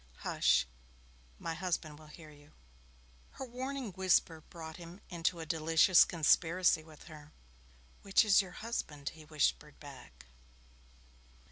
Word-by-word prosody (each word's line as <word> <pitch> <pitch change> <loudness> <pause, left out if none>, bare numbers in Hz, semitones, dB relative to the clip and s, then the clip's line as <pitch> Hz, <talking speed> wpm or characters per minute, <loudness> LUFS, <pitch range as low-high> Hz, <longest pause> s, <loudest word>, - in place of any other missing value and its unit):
'Hush! - - +2 0.7
My 165 - -5
husband 165 -3 -4
will 155 - -15
hear 155 0 -13
you.' 145 +1 -19 0.8
Her 265 - -7
warning 260 -1 -5
whisper 180 -3 +1
brought 160 -2 -9
him 175 +2 -11
into 170 0 -1
a 165 - -6
delicious 165 +2 +4
conspiracy 170 +1 +2
with 155 -1 -16
her. 150 -1 -13 0.7
'Which 195 +3 +3
is 205 -1 +5
your 190 - -9 0.2
husband?' 150 -11 -4
he 160 -1 -14
whispered 150 -1 -1
back. 130 - -13
165 Hz, 125 wpm, -32 LUFS, 155-185 Hz, 0.8 s, is